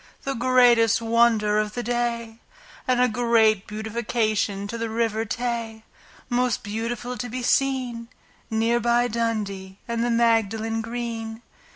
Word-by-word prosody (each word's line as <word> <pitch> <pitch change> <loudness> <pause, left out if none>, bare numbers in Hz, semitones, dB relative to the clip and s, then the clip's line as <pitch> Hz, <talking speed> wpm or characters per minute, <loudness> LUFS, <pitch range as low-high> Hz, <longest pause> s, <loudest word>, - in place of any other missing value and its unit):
The 275 - -2
greatest 240 -2 +4
wonder 225 -2 +3
of 210 0 -2
the 245 - -3
day, 235 -1 -2 0.5
And 255 -1 +2
a 250 - +5
great 225 -3 +2
beautification 215 -2 -1
to 235 - -6
the 230 0 -3
River 225 -1 -1
Tay, 230 -1 -3 0.4
Most 245 0 0
beautiful 230 +3 -4
to 245 +3 -5
be 250 +2 -4
seen, 250 -3 0 0.4
Near 225 +1 +1
by 240 +1 +2
Dundee 210 -5 -3
and 235 0 -1
the 240 - 0
Magdalen 225 -1 +1
Green. 230 -1 -5
230 Hz, 135 wpm, -24 LUFS, 220-240 Hz, 0.5 s, a